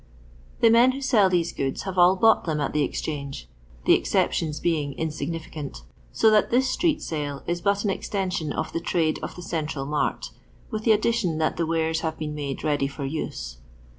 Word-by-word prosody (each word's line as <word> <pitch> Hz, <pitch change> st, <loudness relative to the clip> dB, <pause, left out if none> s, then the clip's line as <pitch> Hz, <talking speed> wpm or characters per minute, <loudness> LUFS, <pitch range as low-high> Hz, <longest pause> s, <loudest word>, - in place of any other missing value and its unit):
The 230 Hz, -, +6 dB
men 240 Hz, +3 st, +6 dB
who 275 Hz, -, -6 dB
sell 230 Hz, -8 st, +4 dB
these 175 Hz, -2 st, 0 dB
goods 135 Hz, -1 st, -2 dB
have 190 Hz, -2 st, -4 dB
all 180 Hz, +1 st, +6 dB
bought 225 Hz, +3 st, +4 dB
them 155 Hz, -3 st, -1 dB
at 145 Hz, -, -1 dB
the 150 Hz, -, +1 dB
Exchange 140 Hz, -, -4 dB, 0.2 s
— -, -, -25 dB
Uie -, -, +7 dB
exceptions 155 Hz, -2 st, 0 dB
being 150 Hz, -5 st, 0 dB
insignificant— 155 Hz, -, -5 dB, 0.3 s
so 220 Hz, -, +4 dB
that 215 Hz, -1 st, +4 dB
this 255 Hz, +2 st, +3 dB
street 335 Hz, -4 st, +1 dB
sale 145 Hz, -3 st, -4 dB
is 175 Hz, 0 st, -2 dB
bat 200 Hz, +2 st, +1 dB
an 205 Hz, -, +1 dB
extension 185 Hz, -6 st, -2 dB
of 160 Hz, -, -3 dB
the -, -, 0 dB
trade 165 Hz, -2 st, 0 dB
of -, -, -6 dB
the 180 Hz, -, -8 dB
central 155 Hz, -5 st, -3 dB
msrt, 150 Hz, +1 st, -1 dB, 0.4 s
with 215 Hz, -1 st, -4 dB
the 225 Hz, -, +5 dB
addition 215 Hz, -6 st, +1 dB
that 155 Hz, 0 st, 0 dB
the 165 Hz, -, 0 dB
wares 160 Hz, 0 st, 0 dB
have 160 Hz, -1 st, -3 dB
been 150 Hz, -1 st, -4 dB
made 145 Hz, -2 st, -4 dB
ready 145 Hz, -3 st, +1 dB
for 140 Hz, 0 st, -6 dB
use. 135 Hz, -, -4 dB
160 Hz, 195 wpm, -25 LUFS, 150-195 Hz, 0.4 s, Uie